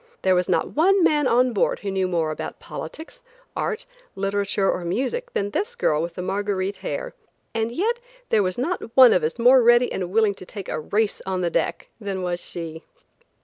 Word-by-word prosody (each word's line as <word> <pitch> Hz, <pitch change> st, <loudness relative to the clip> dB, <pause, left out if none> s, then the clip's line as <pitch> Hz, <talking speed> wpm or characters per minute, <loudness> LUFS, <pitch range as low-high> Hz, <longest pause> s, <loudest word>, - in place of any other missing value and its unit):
There 190 Hz, -, +4 dB
was 180 Hz, 0 st, +1 dB
not -, -, +1 dB
one 370 Hz, +5 st, +4 dB
man 295 Hz, -4 st, +3 dB
on 250 Hz, +1 st, +3 dB
board 200 Hz, -, +1 dB
who 200 Hz, -, -3 dB
knew 190 Hz, -1 st, 0 dB
more 165 Hz, -3 st, 0 dB
about 155 Hz, -, -6 dB
politics, 320 Hz, -, -8 dB, 0.3 s
art, 485 Hz, +3 st, -2 dB, 0.3 s
literature 195 Hz, 0 st, 0 dB
or 180 Hz, -, 0 dB
music, 270 Hz, -, -2 dB
than 200 Hz, 0 st, -1 dB
this 425 Hz, -, -2 dB
girl 150 Hz, -, +1 dB
with 170 Hz, 0 st, -5 dB
Marguerite 195 Hz, +1 st, -2 dB
hair, -, -, -4 dB, 0.4 s
and 225 Hz, 0 st, -1 dB
yet 445 Hz, -, 0 dB, 0.3 s
there 215 Hz, -, +4 dB
was 185 Hz, -2 st, -1 dB
not 265 Hz, -3 st, -3 dB
one 255 Hz, -3 st, +9 dB
of -, -, +2 dB
us 155 Hz, +7 st, -1 dB
more 250 Hz, +2 st, +6 dB
ready 240 Hz, +1 st, +5 dB
and 180 Hz, -2 st, -3 dB
willing 215 Hz, +1 st, +3 dB
to 190 Hz, -, -12 dB
take 200 Hz, -4 st, -8 dB
a -, -, -2 dB
race 205 Hz, +7 st, -1 dB
on 185 Hz, -1 st, -1 dB
deck -, -, -1 dB
than 195 Hz, -3 st, -4 dB
was 175 Hz, -1 st, -2 dB
she. 165 Hz, -2 st, -7 dB
205 Hz, 190 wpm, -23 LUFS, 185-255 Hz, 0.4 s, one